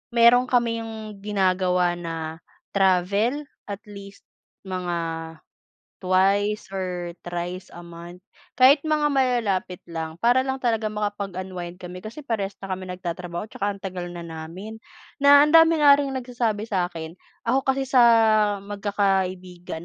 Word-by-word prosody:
meron 240 +2 +6
kami 235 -2 +1
yung 220 -2 -8
ginagawa 185 -3 +1
na 165 -2 -5 0.4
travel, 200 +8 +2 0.2
at 200 -1 -6
least 200 0 -11 0.5
mga 180 -2 -2 1.0
twice 195 +3 +2
or 180 -2 -4
thrice 175 +1 -5
a 175 - -10
month, 170 +2 -11 0.3
kahit 265 +3 +7
mga 300 -1 +2
malalapit 230 -9 0
lang, 160 -1 -6
para 240 +7 +3
lang 265 0 -2
talaga 225 -4 0
makapag-unwind 190 -4 -5
kami 180 0 -9
kasi 230 +9 -9
parehas 205 -6 -3
na 195 -1 -6
kami 185 0 -5
nagtatrabaho 175 0 -5
tsaka 205 - -2
ang 200 -1 -5
tagal 180 -2 -4
na 175 -1 -8
namin, 170 +7 -8 0.4
na 285 +1 +8
ang 300 - 0
dami 325 0 +7
na 290 -2 +7
ring 280 0 +3
nagsasabi 240 -4 -2
sa 185 -5 -1
akin 160 -2 -7 0.3
ako 270 - +2
kasi 270 0 +1
sa 260 -1 +3 0.6
magkakaibigan 190 -4 -2
195 Hz, 135 wpm, -24 LUFS, 180-230 Hz, 1.0 s, na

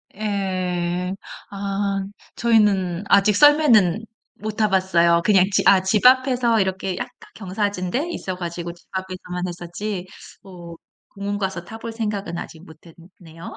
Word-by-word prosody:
예. 185 -3 -2 0.3
아 195 0 -2 0.3
저희는 205 -6 +2
아직 200 +1 +4
썰매는 230 - +5 0.3
못 215 +1 -5
타봤어요. 185 -5 +3
그냥 190 -3 +5
지 - - +3
아 190 -1 +6
집 205 +4 +1
앞에서 250 -3 +4
이렇게 190 -1 -2
약간 - - -4 0.3
경사진 195 -2 -3
데 300 - -1
있어 185 - -4
가지고 170 -1 -5
집 175 - -24
앞에서만 185 -1 -5
했었지. 180 +2 -5 0.4
뭐 175 -3 -11 0.4
공원 200 +1 -3
가서 190 -3 -3
타볼 225 +2 -7
생각은 210 -5 -3
아직 160 0 -9
못 160 0 -14 0.4
했네요. 165 -1 -11
190 Hz, 270 characters per minute, -22 LUFS, 180-210 Hz, 0.4 s, 아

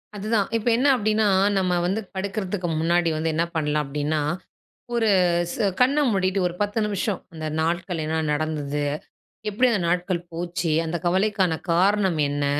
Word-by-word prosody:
அதுதான் 210 0 0
இப்ப 225 - -5
என்ன 265 +4 +2
அப்டின்னா, 215 -2 +1 0.3
நம்ம 180 -2 +1
வந்து 195 +5 0
படுக்றதுக்கு 190 -1 -3
முன்னாடி 170 +1 +2
வந்து 160 +1 0
என்ன 165 +2 +2
பண்லாம் 150 -1 0
அப்டின்னா, 150 +2 -1 0.7
ஒரு 225 -2 +2 0.4
ஸ் - - -6 0.2
கண்ண 260 +4 +4
மூடிட்டு 190 -1 +1
ஒரு 175 - -6
10 205 +2 0
நிமிஷம் 205 -1 -1
அந்த 160 -1 -6 0.2
நாட்கள் 170 +1 -1
என்ன 160 +1 -1
நடந்தது? 150 -1 -2 0.7
எப்டி 210 +5 +2
அந்த 210 - +1
நாட்கள் 180 0 0
போச்சு? 170 0 -2
அந்த 160 +2 -2
கவலைக்கான 190 -1 +2 0.2
காரணம் 190 0 +2
என்ன? 145 0 -1
180 Hz, 150 wpm, -24 LUFS, 160-205 Hz, 0.7 s, கண்ண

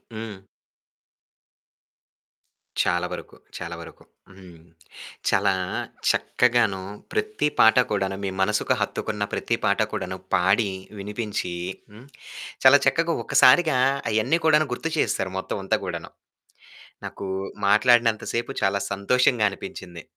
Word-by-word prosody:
హ్మ్. 110 -4 -9 2.4
చాలా 90 0 +1
వరకు, - - -8 0.2
చాలా - - -6
వరకు - - -12 0.4
హ్మ్. 90 -3 -14 0.7
చాలా 100 0 +2 0.6
చక్కగాను 115 -6 +2 0.3
ప్రతి 430 - 0
పాట 110 0 +6
కూడాను 95 -1 -1
మీ - - -1
మనసుకు 105 +3 +1
హత్తుకున్న - - -2
ప్రతి - - 0
పాట - - +2
కూడాను 95 - -4 0.2
పాడి, 95 +4 +2 0.3
వినిపించి 105 -3 -4 0.4
హ్మ్. 110 +5 -14 0.6
చాలా 135 +2 +8
చక్కగా 165 0 +2
ఒక్కసారిగా 135 +2 +5 0.3
అయన్ని 110 +10 +2
కూడాను 155 -1 +4
గుర్తు 165 +6 -4
చేసేసారు 95 -9 0
మొత్తమంతా 95 0 -2
కూడాను. - - -6 1.0
నాకు 100 - -7 0.4
మాట్లాడినంత 115 +1 +4
సేపు 120 0 -2
చాలా 100 +1 +1
సంతోషంగా 120 +3 +2
అనిపించింది. 90 -3 -9
105 Hz, 105 wpm, -24 LUFS, 95-125 Hz, 2.4 s, చాలా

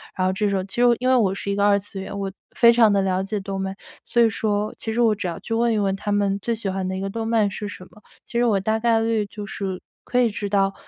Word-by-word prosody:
然 185 0 +1
后 185 - +1
这 205 +1 0
种 190 -2 -1
其 195 - -8
实 - - +5 0.2
因 255 - -1
为 260 - +5
我 200 -6 +3
是 200 - -5
一 200 - 0
个 200 - +1
二 200 -1 +4
次 200 -1 -8
元， 200 +1 -6
我 195 - -2 0.3
非 235 -1 +6
常 230 -3 +5
的 200 -1 +3
了 190 0 0
解 205 +2 -3
动 195 0 -5
漫， 190 0 -3 0.3
所 240 - +2
以 230 - +5
说 210 0 -1
其 225 - -4
实 240 - -2
我 225 -2 +4
只 200 - -6
要 170 -2 -4
去 - - -5
问 235 +1 +2
一 - - +1
问 195 -2 +1
他 205 +1 -4
们 200 -1 +1
最 235 - -1
喜 210 -3 -3
欢 190 0 -2
的 190 - -3
一 - - -3
个 195 - -3
动 225 +2 -4
漫 220 -3 +2
是 205 +1 -5
什 185 -2 -9
么， 210 - -19 0.2
其 235 - -5
实 240 - +3
我 205 -4 +3
大 220 +3 0
概 230 -1 +3
率 225 -2 +1
就 205 0 -8
是 190 -1 -5 0.2
可 250 - 0
以 240 - +4
知 205 -1 -4
道， 195 -1 +2
205 Hz, 330 characters per minute, -23 LUFS, 195-225 Hz, 0.3 s, 非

